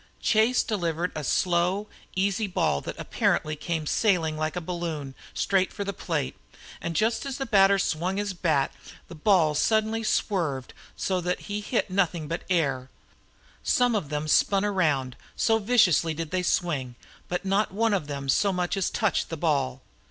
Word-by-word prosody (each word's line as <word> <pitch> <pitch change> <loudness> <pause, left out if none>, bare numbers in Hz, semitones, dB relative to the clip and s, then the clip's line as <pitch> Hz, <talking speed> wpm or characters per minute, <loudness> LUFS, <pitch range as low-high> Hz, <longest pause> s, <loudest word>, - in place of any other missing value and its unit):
Chase 225 +3 +3
delivered 175 -4 -1
a 155 - -3
slow, 180 +7 +1 0.3
easy 200 +3 +1
ball 75 - 0
that - - -6
apparently 155 0 0
came 160 +1 -3
sailing 165 -4 +1
like 155 +1 -2
a - - -1
balloon 165 -5 -4 0.2
straight 190 -1 +1
for 200 - -4
the 200 0 -3
plate, 65 - -2 0.5
and 170 -1 -3
just 225 +4 +1
as 275 -2 -4
the 270 - -3
batter 200 -3 +5
swung 185 +1 -1
his 205 -1 -2
bat 160 -6 +1 0.4
the - - -8
ball 165 -2 +3
suddenly 220 +7 +1
swerved 170 - -1 0.2
so 185 -2 -1
that 180 +1 -2
he 205 0 -4
hit 210 -2 -1
nothing 175 -4 0
but 165 +3 -4
the 190 - +1
air. 135 -6 0 0.7
Some 245 -1 +2
of 195 -10 -1
them 150 0 -2
spun 195 +6 +3
around, 150 -11 0 0.2
so 225 -1 +2
viciously 185 - +3
did 165 -1 -5
they 185 0 0
swing, 150 -8 -1 0.3
but 180 +2 -3
not 195 +2 +1
one 225 +3 +1
of 180 -7 -1
them 140 -1 -5
so 200 +9 +3
much 180 0 -1
as 195 -2 0
touched - - 0
the 165 - -4
ball. 140 -5 0
180 Hz, 175 wpm, -26 LUFS, 155-200 Hz, 0.7 s, batter